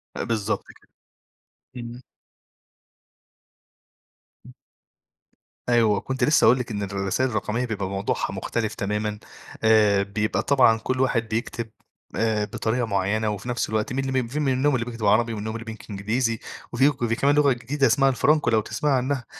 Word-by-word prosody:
أ - - -3
بالضبط 110 -4 -2 0.2
كده. - - -29 0.9
إمم. 120 +1 -8 2.4
إمم. - - -13 1.2
أيوه. 115 -4 +3
وكنت 130 +4 -3
لسّه 150 +5 +4
هاقول 125 - +5
لِك 125 -2 -4
إن 105 -1 -3
الرسايل 100 +6 -1
الرقمية 110 +2 -2
بيبقى 100 -5 -3
موضوعها 100 0 -2
مختلف 110 -1 -3
تمامًا. 105 +1 -2 0.4
آآ 105 -3 +4
بيبقى 105 +2 -1
طبعًا 125 -5 +4
كل 130 +3 -3
واحد 115 -3 +1
بيكتب 115 0 -3 0.5
آآ 110 -2 +1
بطريقة 115 +3 -1
معيّنة 100 +1 0
وفي 105 +3 -5
نَفس 120 - -1
الوقت 110 +2 -1
من 135 +1 -1
الم 130 - -2
من 130 -2 0
في 140 +6 -4
منهم 135 0 +2
اللي 115 -2 -1
بيكتب 115 -3 -5
عربي 115 +3 +3
ومنهم 110 0 -4
اللي 115 0 -7
بينك 110 0 -9
إنجليزي 110 +3 -1 0.3
وفي 135 - +4
وك 140 -4 -7
وفي 115 -1 +1
كمان 140 +4 +2
لغة 145 -2 +4
جديدة 135 +4 0
اسمها 135 +4 +3
الفرانكو 150 +3 +2
لو 110 -1 +3
تسمعي 145 +6 -1
عنّها، 130 0 -2
115 Hz, 160 wpm, -24 LUFS, 105-130 Hz, 2.4 s, هاقول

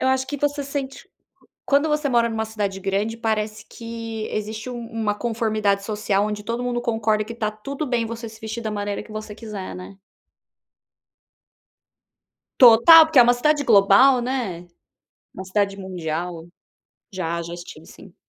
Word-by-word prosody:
Eu 260 - +1
acho 260 0 +1
que 290 - -4
você 290 0 -1
sente 275 -1 -5
q - - -37 0.6
quando 285 +2 +2
você 300 -1 0
mora 235 -2 +2
numa 220 -1 -2
cidade 205 -3 -3
grande, 200 +3 -1
parece 215 -1 -2
que 230 -1 -6
existe 215 +3 -4
um 240 - -6
uma 220 -2 -1
conformidade 215 -3 -1
social, 210 -1 0
onde 210 0 -4
todo 235 +3 -3
mundo 245 -1 -2
concorda 225 -3 0
que 230 +2 -9
tá 215 -2 -2
tudo 275 +8 -6
bem 240 -2 0
você 230 +1 -6
se 220 0 -13
vestir 220 +1 -5
da 215 - -3
maneira 205 0 -3
que 220 - -15
você 215 -1 -7
quiser, 215 -4 -7
né. 185 +2 -11 2.6
Total! 255 +7 +9
Porque 315 -3 +2
é - - +11
uma 240 +1 +4
cidade 295 +4 +1
global, 220 +4 +5
né. 235 -9 -3 0.7
Uma 190 - -7
cidade 195 +1 -1
mundial. 175 -2 -5 0.7
Já, 170 -3 -3
já 170 +1 -7
estive 175 0 -11
sim. - - -15
220 Hz, 165 wpm, -22 LUFS, 205-245 Hz, 2.6 s, é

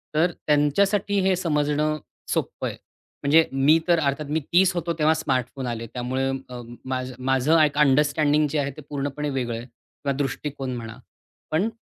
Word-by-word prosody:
तर 170 +3 +3 0.2
त्यांच्यासाठी 195 +8 +2
हे 190 0 +3
समजणं 150 -3 0 0.3
सोपं - - -2
आहे. - - -6 0.5
म्हणजे 160 +3 +5
मी 135 +4 +4
तर 170 -1 +4
अर्थात 145 0 -1
मी 160 - +2
30 185 +1 +5
होतो 170 -1 -2
तेव्हा 155 +1 +4
स्मार्टफोन 130 -3 -2
आले 115 -1 -4
त्यामुळे 130 +3 -2 0.2
अ, 125 -1 -7 0.2
माझं 130 0 -3 0.2
माझं 135 +5 +4
एक 145 -1 +1
अंडरस्टँडिंग 150 +1 +3
जे 155 - 0
आहे 140 0 -1
ते 155 - -8
पूर्णपणे 145 +1 -3
वेगळं 125 -4 -2
आहे 115 - -7
किंवा 135 +3 -6
दृष्टिकोन 135 -1 -3
म्हणा. 115 -1 -7 0.5
पण 180 +8 +1
145 Hz, 160 wpm, -24 LUFS, 130-155 Hz, 0.5 s, म्हणजे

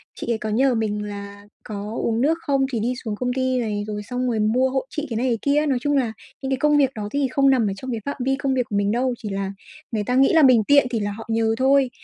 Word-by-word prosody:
chị 235 - -4
ấy 225 - +1
có 215 0 -4
nhờ 255 +4 +2
mình 210 -2 -1
là 200 0 -8 0.2
có 210 +1 -6
uống 230 0 0
nước 315 +5 +2
không 275 -2 +1
thì 235 - -1
đi 240 +4 0
xuống 220 -4 -3
công 250 +3 -2
ty 260 0 0
này, 210 -3 -2
rồi 210 -1 -4
xong 250 +3 -3
rồi 230 -3 0
mua 240 +5 +2
hộ 265 0 -1
chị 305 0 -4
cái 225 - -2
này, 245 - 0
cái 235 -2 +1
kia 285 +1 +2
á, 305 - 0
nói 275 -4 +1
chung 290 -1 +1
là 240 -5 0 0.3
những 270 - -3
cái 265 - +1
công 295 +2 +3
việc 270 -2 +3
đó 210 -2 -4
thì 285 -1 +1
không 275 0 +3
nằm 245 -5 +3
ở 195 - -1
trong 260 +5 -6
cái 230 - -2
phạm 280 - -3
vi 270 0 +2
công 275 -1 -1
việc 255 -1 +1
của 205 - -3
mình 200 0 +1
đâu, 250 +2 0
chỉ 210 - -6
là 195 0 -3 0.4
người 215 -3 -1
ta 250 +4 -1
nghĩ 270 +4 +4
là 320 -2 +6
mình 250 -4 +6
tiện 285 +3 +4
thì 235 -3 -1
là 205 0 -2
họ 225 +2 -8
nhờ 225 0 +1
thôi. 270 0 +3
245 Hz, 305 wpm, -22 LUFS, 215-270 Hz, 0.4 s, là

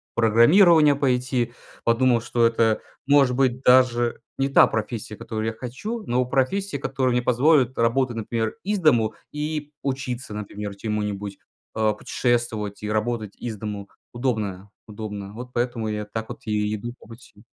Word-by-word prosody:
программирование 150 - +6
пойти, 125 -3 0 0.3
подумал, 120 0 +3
что 120 0 +1
это, 115 -1 +2 0.3
может 140 -3 +4
быть, 130 -1 +1
даже 125 -2 +4 0.2
не 135 - +1
та - - +6
профессия, 110 -1 -4
которую 110 -1 -4
я 110 - -1
хочу, 130 - -6
но 125 +1 +1
профессия, 140 +9 0
которая 130 -2 0
мне 125 - +2
позволит 130 0 +3
работать, 120 +1 +1
например, 115 - -2
из 205 0 -1
дому 120 -10 +3 0.2
и 150 0 -3
учиться, 130 -4 -3
например, 105 -1 -6
чему-нибудь, 105 -1 -3 0.4
э, 110 -1 +2
путешествовать 115 -4 -1
и 105 - -3
работать 110 -1 -2
из 115 -3 -5
дому 100 -1 -6 0.2
удобно, 105 -6 -2 0.2
удобно. 105 -2 -7
Вот 125 +3 -8
поэтому 120 -2 -1
я 105 0 -3
так 110 +1 -6
вот - - -8
и 105 0 0
иду 120 +3 -6
по - - -17
пути. 115 +2 -15
120 Hz, 150 wpm, -24 LUFS, 110-130 Hz, 0.4 s, программирование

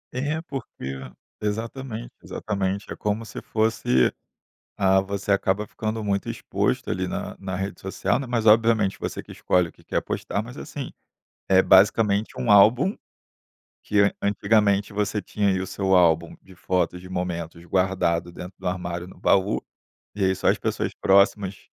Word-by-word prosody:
É, 150 +5 -1
porque 125 - -6 0.5
exatamente, 115 +3 -4
exatamente, 100 -1 -3
é - - -9
como 105 +2 -2
se - - -8
fosse, 110 - +1 0.6
ah, 95 -1 +4
você 100 +1 -1
acaba 100 +2 0
ficando 110 0 -4
muito 100 -2 -1
exposto, - - -1
ali - - -1
na - - -4
na 95 -2 -5
rede 95 +1 -4
social, 95 +2 0
né 135 - -4
mas 120 -2 -1
obviamente 110 -2 +4
você - - -4
que - - -12
escolhe 90 -2 +1
o - - -13
que - - -23
quer - - -1
postar, 100 - -3
mas, 120 +4 -10
assim, 140 -4 -7 0.6
é 95 -1 +5
basicamente 100 +2 +4
um 115 - 0
álbum, 120 - +5 0.9
que 100 -1 +2
antigamente, 100 0 +2
você 105 0 0
tinha 100 0 -1
aí 95 -1 0
o 95 - -3
seu 95 0 0
álbum 85 -2 +3
de 95 - -17
fotos, 90 0 -1
de 90 - -10
momentos 85 -2 -4
guardado 90 -2 0
dentro 90 +1 -9
do - - -8
armário 90 -1 -3
no 95 - -15
baú, 100 +1 +2 0.5
e 105 - -3
aí 95 0 +3
só - - +1
as - - +3
pessoas - - -2
próximas, 100 0 +3
100 Hz, 160 wpm, -24 LUFS, 95-110 Hz, 0.9 s, é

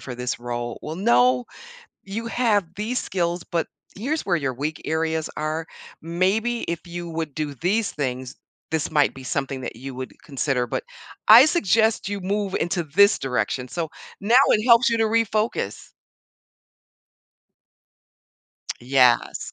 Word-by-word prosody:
for 125 - -7
this 125 +1 -3
role. 120 -1 -4
Well, 155 +2 -5
no, 125 -7 +3 0.6
you 210 +4 -5
have 225 -5 +1
these 225 +5 -2
skills, 175 -1 -2
but 170 -2 -1 0.3
here's 295 +9 -2
where 180 -3 +2
your 140 -5 -1
weak 150 +4 -4
areas 160 0 -1
are, 155 +1 -2 0.4
maybe 195 +8 0
if 170 -1 -3
you 175 0 -6
would 160 -3 -4
do 150 -2 -3
these 200 - 0
things, 130 -2 -4 0.4
this 160 -2 -1
might 150 -2 +3
be 130 - -10
something 135 0 -3
that 120 - -6
you 130 +3 -8
would 130 0 -6
consider. 135 -3 -1
But - - -3 0.4
I 230 +6 +10
suggest 220 - +2
you 205 -1 -3
move 195 +1 -2
into 175 0 -1
this 200 +8 +4
direction." 125 -1 -2
So 165 +4 -4 0.3
now 225 +5 +2
it 215 - +3
helps 240 +1 +6
you 230 - +1
to 225 - +2
refocus. 220 - -1 2.9
Yes. 125 -1 +2
165 Hz, 145 wpm, -23 LUFS, 135-210 Hz, 2.9 s, I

